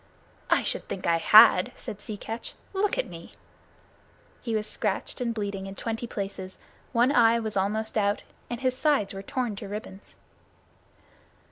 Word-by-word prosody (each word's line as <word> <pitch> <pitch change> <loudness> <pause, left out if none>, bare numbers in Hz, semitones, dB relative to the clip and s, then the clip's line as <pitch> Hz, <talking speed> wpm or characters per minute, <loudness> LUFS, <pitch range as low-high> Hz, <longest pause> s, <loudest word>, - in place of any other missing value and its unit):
"I - - +4
should - - -2
think 190 - -5
I 170 -1 +3
had," 200 +2 +7
said 205 - -8
Sea 210 0 -6
Catch. 225 +3 -6 0.2
"Look 400 +1 +1
at - - 0
me!" - - -11 1.1
He 230 -2 -2
was 215 0 0
scratched 210 +2 -2
and 240 -1 0
bleeding 200 -3 -4
in 195 - -8
twenty 225 +2 -4
places; 195 -3 -5 0.3
one 240 +2 +3
eye 230 -3 +5
was 220 -2 -3
almost 215 +3 0
out, 205 0 0 0.3
and 240 +1 -4
his 255 -1 +1
sides 275 -8 +1
were 195 - -6
torn 245 +1 -2
to 205 - -7
ribbons. 205 -1 -8
215 Hz, 160 wpm, -27 LUFS, 200-235 Hz, 1.1 s, had